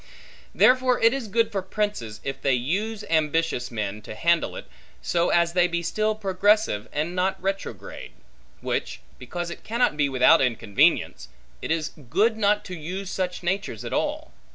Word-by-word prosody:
Therefore 255 0 +4
it 230 +2 +5
is 270 -5 -3
good 225 +2 +1
for 195 -2 -1
princes, 190 - -3
if 135 -1 -5
they 135 -2 +2
use 200 - -2
ambitious 155 -5 0
men, 105 -2 -4
to 105 - -9
handle 170 +7 +1
it, - - -7 0.3
so 170 0 0
as 170 0 +2
they 180 0 +4
be 170 -1 -2
still 215 +5 0
progressive 200 - +1
and 155 +4 -2
not 190 +1 0
retrograde; 195 +1 -5 0.5
which, - - -3 0.2
because 170 +7 -5
it - - -9
cannot 235 -6 +1
be 145 -2 +1
without 130 0 +5
inconvenience, 115 -5 +1 0.3
it - - -5
is 160 -1 -1 0.2
good 220 - +3
not 210 -1 +1
to 185 - -6
use 185 +4 -5
such 180 -1 -3
natures 190 - -2
at - - -5
all. - - -2
180 Hz, 165 wpm, -25 LUFS, 150-210 Hz, 0.5 s, it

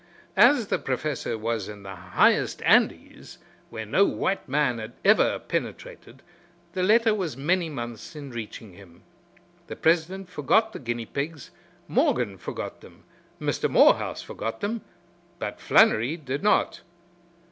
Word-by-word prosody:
As 245 -8 +5
the - - +1
Professor 135 -3 -3
was 110 -2 -3
in 105 -1 -10
the 95 0 -8
highest 90 0 +1
Andes, - - +1 0.3
where 110 0 -6
no 150 - +3
white 195 -4 -1
man 135 -4 +1
had 110 +2 -7
ever 215 +2 +4
penetrated, - - -6 0.5
the 185 - -2
letter 220 +4 +4
was 180 - -3
many 170 +4 0
months 120 -1 -7
in 145 -3 -8
reaching 110 -3 -8
him. 85 -2 -17 0.6
The - - -6
president 175 +4 +1
forgot 200 - +1
the - - -7
guinea 120 -2 -4
pigs, 145 +3 -5 0.4
Morgan 105 -7 +1
forgot - - -6
them, - - -17 0.4
Mr. - - -1
Morehouse - - +4
forgot 115 - -5
them, 215 +2 -2 0.6
but - - -5
Flannery 125 +10 +4
did 140 -3 -4
not. 210 +1 +2
140 Hz, 135 wpm, -25 LUFS, 115-185 Hz, 0.6 s, As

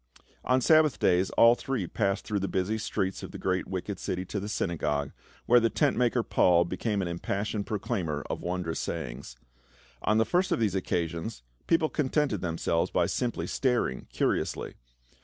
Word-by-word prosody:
On 130 0 +2
Sabbath 155 0 +5
days 90 +2 +2
all 115 0 +8
three 125 -4 -2
passed 100 +2 -1
through 105 -2 -1
the 100 - -2
busy 95 +4 -1
streets 95 -3 -2
of - - -7
the - - -8
great 95 -1 -1
wicked 95 +1 -4
city 90 0 -3
to 100 - -3
the 100 +2 -5
synagogue, 75 -8 -1 0.3
where 120 +1 +6
the 115 -1 +2
tent - - +1
maker, 120 0 +2
Paul, 85 -4 +4
became 100 +4 -2
the 90 - -2
impassioned 100 +4 -3
proclaimer 95 - -2
of - - -4
wondrous 90 -2 -2
sayings. - - -5 0.7
On 110 - +2
the 110 - +4
first 180 +1 +1
of - - +2
these 110 -3 +1
occasions 85 - -2 0.2
people 165 -1 +3
contented 150 0 0
themselves 85 -1 0
by - - +2
simply 120 -2 -2
staring 125 - 0
curiously. - - -1
100 Hz, 170 wpm, -28 LUFS, 85-115 Hz, 0.7 s, all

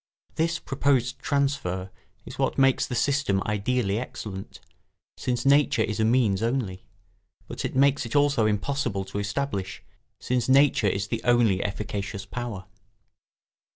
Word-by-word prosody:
This 170 +1 0
proposed 135 -3 0
transfer 135 - -1 0.3
is - - -10
what - - 0
makes 135 -1 +3
the 125 - -4
system 140 -7 +1
ideally 105 0 0
excellent, 100 -5 -7 0.6
since 125 0 -2
nature 140 -4 +4
is 110 0 -3
a - - +3
means 110 -4 +2
only; 115 -6 -2 0.6
but - - -6
it - - -3
makes 140 +1 +3
it 115 +1 -6
also 145 -4 +3
almost 110 - +3
impossible 110 -4 -2
to 95 +1 -5
establish, 100 -4 -3 0.4
since 125 -1 -1
nature 135 -5 +4
is 100 +2 -1
the 115 -1 -2
only 115 -6 +3
efficacious 100 0 -4
power. 110 -3 -6
120 Hz, 140 wpm, -26 LUFS, 100-135 Hz, 0.6 s, nature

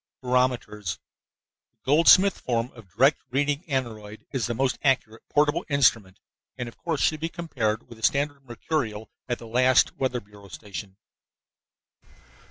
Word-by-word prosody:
BAROMETERS 125 -6 0 0.8
The - - -48
Goldsmith 170 +7 +6
form 120 0 -1
of 115 -6 -15
direct 135 +5 +4
reading 145 +4 0
aneroid 110 -7 -4
is 130 -4 -1
the 120 - -2
most 130 +1 0
accurate 125 -5 +1
portable 150 +1 +2
instrument 115 -9 +2 0.4
and, 125 -2 -4
of 115 - -10
course, 160 +1 -3
should 155 - +2
be 165 +2 -2
compared 125 -11 -2
with 115 - -13
a - - -15
standard 140 +1 +1
mercurial 120 -3 -3 0.2
at 120 - 0
the - - -11
last 125 +2 +3
weather 130 -2 -1
bureau 100 -1 -16
station. 100 +1 -9
125 Hz, 145 wpm, -26 LUFS, 110-140 Hz, 0.8 s, Goldsmith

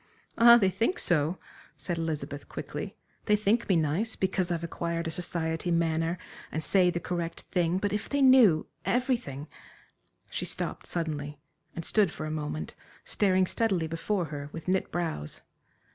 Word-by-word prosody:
"Ah, 235 0 +9
they 195 -5 +3
think 225 - 0
so," 165 +1 +2 0.4
said 175 -2 -3
Elizabeth, 150 -3 -4
quickly, - - -6 0.3
"they 210 - +4
think 215 +3 +1
me 190 - +4
nice, 165 +8 +1
because 190 -1 0
I've 170 -1 -1
acquired 170 0 -3
a - - -2
society 165 0 -2
manner, 165 0 +1 0.3
and 160 - -2
say 185 0 +4
the 175 - -1
correct 170 -1 -4
thing, 175 -1 +1
but 205 +1 -1
if 210 - -3
they 285 - 0
knew 255 - +6 0.2
everything" 240 - -1 0.8
she - - -2
stopped - - -4
suddenly 150 -3 -3 0.4
and 165 - -5
stood 210 -4 +3
for - - -6
a 155 - -3
moment 150 - -4 0.3
staring 190 -2 +2
steadily 190 -4 0
before 170 +4 -1
her, 145 0 -5
with 165 +1 -8
knit 185 +1 0
brows. 160 - -3
170 Hz, 160 wpm, -29 LUFS, 160-200 Hz, 0.8 s, Ah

